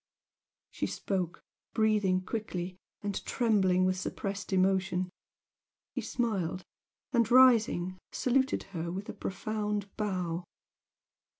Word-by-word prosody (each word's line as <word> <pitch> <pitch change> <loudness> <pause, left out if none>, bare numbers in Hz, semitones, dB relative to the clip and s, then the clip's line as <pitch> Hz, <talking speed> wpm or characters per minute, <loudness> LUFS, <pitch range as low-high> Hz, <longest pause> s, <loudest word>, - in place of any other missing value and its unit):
She - - -2
spoke, 185 -3 -2 0.3
breathing 210 -4 +3
quickly, 185 -5 -3 0.3
and 200 -1 -2
trembling 190 -6 +3
with 185 0 +1
suppressed 200 +2 -4
emotion. 185 -1 +2 0.8
He - - -2
smiled, 190 -7 -1 0.5
and, 235 -3 +3
rising, 225 -8 +5
saluted 265 +2 +1
her 170 -1 -3
with 195 +3 -5
a - - -3
profound 210 0 -3
bow. 180 -5 -1
195 Hz, 100 wpm, -31 LUFS, 185-215 Hz, 0.8 s, rising